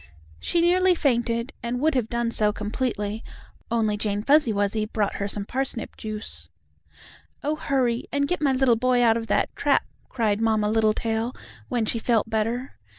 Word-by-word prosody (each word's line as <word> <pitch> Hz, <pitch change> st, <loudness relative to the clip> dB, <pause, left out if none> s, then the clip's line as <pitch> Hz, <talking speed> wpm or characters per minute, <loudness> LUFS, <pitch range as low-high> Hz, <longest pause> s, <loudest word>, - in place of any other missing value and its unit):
She 340 Hz, -, +1 dB
nearly 365 Hz, +1 st, +4 dB
fainted, 240 Hz, -3 st, 0 dB
and 245 Hz, +1 st, -2 dB
would 310 Hz, +3 st, +2 dB
have 245 Hz, -4 st, 0 dB
done 235 Hz, -1 st, -1 dB
so 210 Hz, -2 st, +2 dB
completely, 210 Hz, 0 st, -3 dB, 0.5 s
only 220 Hz, -3 st, +1 dB
Jane 205 Hz, -1 st, -1 dB
Fuzzy 285 Hz, -2 st, +4 dB
Wuzzy 205 Hz, +1 st, 0 dB
brought 210 Hz, -2 st, -1 dB
her 200 Hz, -, -2 dB
some 200 Hz, 0 st, 0 dB
parsnip 260 Hz, -1 st, -3 dB
juice. 215 Hz, -1 st, -6 dB, 0.9 s
"Oh, 300 Hz, +2 st, 0 dB
hurry 260 Hz, -5 st, 0 dB
and 285 Hz, 0 st, +1 dB
get 360 Hz, -1 st, -1 dB
my 285 Hz, -2 st, +3 dB
little 255 Hz, -2 st, +4 dB
boy 250 Hz, +1 st, +2 dB
out 225 Hz, -1 st, +5 dB
of 225 Hz, 0 st, -3 dB
that -, -, 0 dB
trap!" -, -, +2 dB, 0.2 s
cried 220 Hz, -4 st, 0 dB
Mamma 215 Hz, -2 st, +2 dB
Littletail, 225 Hz, +2 st, +1 dB, 0.3 s
when 235 Hz, -3 st, 0 dB
she 230 Hz, -, -1 dB
felt 225 Hz, -1 st, +1 dB
better. 230 Hz, +4 st, -2 dB
230 Hz, 165 wpm, -25 LUFS, 215-260 Hz, 0.9 s, out